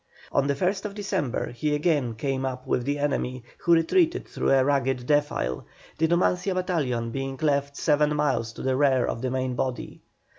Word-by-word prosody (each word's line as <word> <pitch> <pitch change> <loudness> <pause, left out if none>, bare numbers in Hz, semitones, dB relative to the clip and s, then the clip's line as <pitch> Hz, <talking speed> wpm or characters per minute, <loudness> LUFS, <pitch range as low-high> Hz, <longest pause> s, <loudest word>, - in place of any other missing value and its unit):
On 140 0 +2
the 140 - +1
1st 195 +6 -1
December 190 - -2
he 150 +5 -1
again 145 -7 +1
came 135 +3 -2
up 130 -1 -4
with 120 - 0
the 145 +1 0
enemy, 130 -3 -1 0.2
who 170 - +3
retreated 325 - +2
through - - -2
a 135 -1 +4
rugged 135 -3 +1
defile, 145 - 0 0.4
the 160 - +3
Numancia 180 +2 +1
battalion 140 -11 -1
being 135 +1 -4
left 140 -2 0
seven 150 -1 +2
miles 130 -7 0
to - - -8
the 130 0 +1
rear 130 -3 +3
of 115 - -3
the 130 - -1
main 130 0 -1
body. 125 0 -4
140 Hz, 180 wpm, -26 LUFS, 130-155 Hz, 0.4 s, a